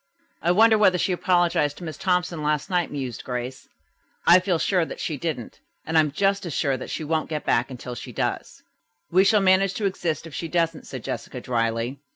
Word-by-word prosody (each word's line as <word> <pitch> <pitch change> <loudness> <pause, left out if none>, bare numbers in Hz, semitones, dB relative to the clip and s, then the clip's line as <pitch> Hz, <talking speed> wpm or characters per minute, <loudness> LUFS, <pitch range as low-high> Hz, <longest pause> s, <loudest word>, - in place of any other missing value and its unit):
"I 170 - 0
wonder 220 +3 +5
whether 185 -4 +5
she 185 - 0
apologized 175 -5 +1
to - - -10
Miss 160 -2 -5
Thompson 180 -3 0
last 150 +2 -1
night," 175 -2 +1
mused 130 -5 -5
Grace. 125 +1 -5 0.6
"I 175 +2 +8
feel 185 -2 0
sure 180 +1 +1
that - - -7
she 155 - -2
didn't, 140 -5 -5 0.3
and 160 - -3
I - - +7
am 150 -2 -1
just 195 +5 +1
as 170 -5 -5
sure 140 -1 +1
that 130 - -7
she - - -4
won't 155 +1 -1
get 155 -2 -4
back 120 +3 +2
until 125 -1 -7
she 120 - -8
does." - - -3 0.5
"We 185 +2 +5
shall 205 +1 +4
manage 195 0 +3
to 210 - -2
exist 170 -5 -2
if 165 - -10
she 165 - -4
doesn't," 165 -1 -1
said 130 -4 -7
Jessica 120 +2 -5
dryly. 115 +1 -1
160 Hz, 210 wpm, -24 LUFS, 135-180 Hz, 0.6 s, I